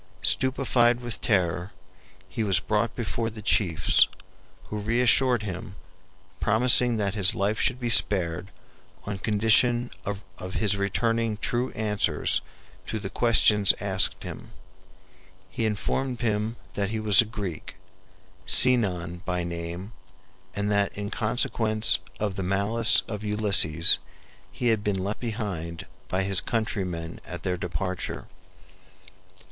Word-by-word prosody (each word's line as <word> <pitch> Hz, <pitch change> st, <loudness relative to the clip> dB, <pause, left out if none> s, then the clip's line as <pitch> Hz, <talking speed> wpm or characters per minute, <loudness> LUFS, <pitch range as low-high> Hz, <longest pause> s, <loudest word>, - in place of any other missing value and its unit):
Stupefied 125 Hz, -2 st, +2 dB
with 120 Hz, -2 st, -7 dB
terror, 95 Hz, -4 st, 0 dB, 0.5 s
he 110 Hz, +4 st, -4 dB
was 95 Hz, -4 st, +1 dB
brought 110 Hz, +1 st, -1 dB
before 115 Hz, -1 st, -3 dB
the 110 Hz, -1 st, -11 dB
chiefs, 90 Hz, -7 st, +3 dB, 0.6 s
who 105 Hz, -, -6 dB
reassured 120 Hz, +2 st, +2 dB
him, 95 Hz, -1 st, -7 dB, 0.6 s
promising 120 Hz, +2 st, +4 dB
that 100 Hz, -2 st, -1 dB
his 100 Hz, -3 st, +6 dB
life 100 Hz, +2 st, -1 dB
should 125 Hz, -, 0 dB
be 120 Hz, -2 st, -2 dB
spared 90 Hz, -4 st, +2 dB, 0.6 s
on 100 Hz, -1 st, -5 dB
condition 115 Hz, +4 st, +1 dB
of 95 Hz, -2 st, -8 dB
his 105 Hz, -2 st, +1 dB
returning 115 Hz, +2 st, -1 dB
true 120 Hz, +4 st, -2 dB
answers 105 Hz, -8 st, 0 dB, 0.5 s
to -, -, -3 dB
the 100 Hz, -2 st, -6 dB
questions 105 Hz, -3 st, +4 dB
asked 100 Hz, -1 st, +2 dB
him. -, -, -9 dB, 1.0 s
He 110 Hz, +4 st, -2 dB
informed 125 Hz, +4 st, -2 dB
them 110 Hz, -1 st, -2 dB, 0.2 s
that 100 Hz, -1 st, -2 dB
he 110 Hz, 0 st, -3 dB
was 110 Hz, +1 st, +4 dB
a -, -, -2 dB
Greek, 105 Hz, -7 st, -7 dB, 0.7 s
Sinon 95 Hz, -9 st, +3 dB
by 90 Hz, -2 st, -3 dB
name, 85 Hz, +3 st, -6 dB, 0.6 s
and 100 Hz, +1 st, -2 dB
that 100 Hz, -1 st, 0 dB
in 100 Hz, 0 st, -5 dB
consequence 110 Hz, -1 st, +1 dB, 0.2 s
of 105 Hz, -3 st, -3 dB
the -, -, -2 dB
malice 100 Hz, +4 st, +3 dB
of 105 Hz, -1 st, -6 dB
Ulysses 100 Hz, -7 st, +4 dB, 0.5 s
he 120 Hz, -, -1 dB
had 110 Hz, -2 st, 0 dB
been 105 Hz, -2 st, -1 dB
left 100 Hz, +2 st, -4 dB
behind 100 Hz, -8 st, -5 dB, 0.2 s
by 95 Hz, +1 st, -1 dB
his 95 Hz, 0 st, +4 dB
countrymen 90 Hz, -7 st, -4 dB
at 90 Hz, -, -9 dB
their 90 Hz, -2 st, -1 dB
departure. 90 Hz, +1 st, -5 dB
105 Hz, 125 wpm, -25 LUFS, 95-115 Hz, 1.0 s, his